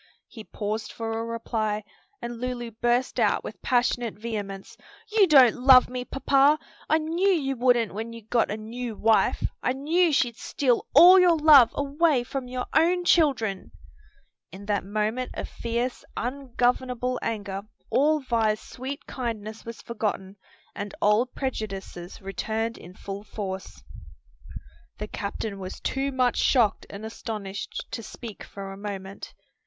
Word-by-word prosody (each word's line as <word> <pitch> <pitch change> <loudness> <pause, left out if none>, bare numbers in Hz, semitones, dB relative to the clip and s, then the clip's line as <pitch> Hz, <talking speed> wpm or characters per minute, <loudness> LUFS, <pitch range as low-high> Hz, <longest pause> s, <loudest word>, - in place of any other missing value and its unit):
He 220 - -11
paused 215 +1 -4
for 225 -1 -5
a 225 0 -2
reply, 225 -2 -2 0.4
and 235 0 -6
Lulu 245 -2 -4
burst 240 +3 0
out - - +2
with - - -8
passionate 245 -2 +1
vehemence, 205 -3 -6 0.4
"You 425 -3 +5
don't 265 -7 +7
love 255 0 +7
me, 250 0 -4
papa! 275 +2 +3 0.3
I 315 - +5
knew 330 +5 0
you 280 -8 +1
wouldn't 245 -3 +2
when 225 +3 -5
you 230 -1 -10
got 230 +2 +1
a 210 - -3
new 230 +1 -6
wife. 220 +1 +2 0.2
I 250 - +1
knew 320 +6 +2
she'd 245 -5 +1
steal 250 -4 0
all 355 +5 +10
your 350 -2 +5
love 295 -6 +8
away 285 -1 +2
from 260 +1 -5
your 250 0 -4
own 350 +3 +3
children!" 260 - +2 0.8
In 195 +3 -10
that 205 -1 0
moment 215 +5 -2
of - - -4
fierce, 235 +2 -3
ungovernable 250 -1 -1
anger 205 -3 -3 0.3
all 305 +2 +3
Vi's 225 -4 +1
sweet 265 +4 -7
kindness 225 -3 -5
was 230 0 -8
forgotten 205 -4 -3 0.4
and 205 -1 -6
old 215 +5 +2
prejudices 195 -8 -5
returned 220 +4 -3
in 180 +2 -13
full 200 +1 -7
force. 190 - -6 1.1
The 210 - -5
captain 200 0 -5
was 185 -1 -7
too 275 +1 -2
much 255 -2 +1
shocked 230 -6 +2
and 205 +2 -8
astonished 210 -3 -6
to - - -4
speak 225 -1 -9
for 195 -1 -8
a - - -9
moment. 195 -1 -7
235 Hz, 145 wpm, -26 LUFS, 210-260 Hz, 1.1 s, all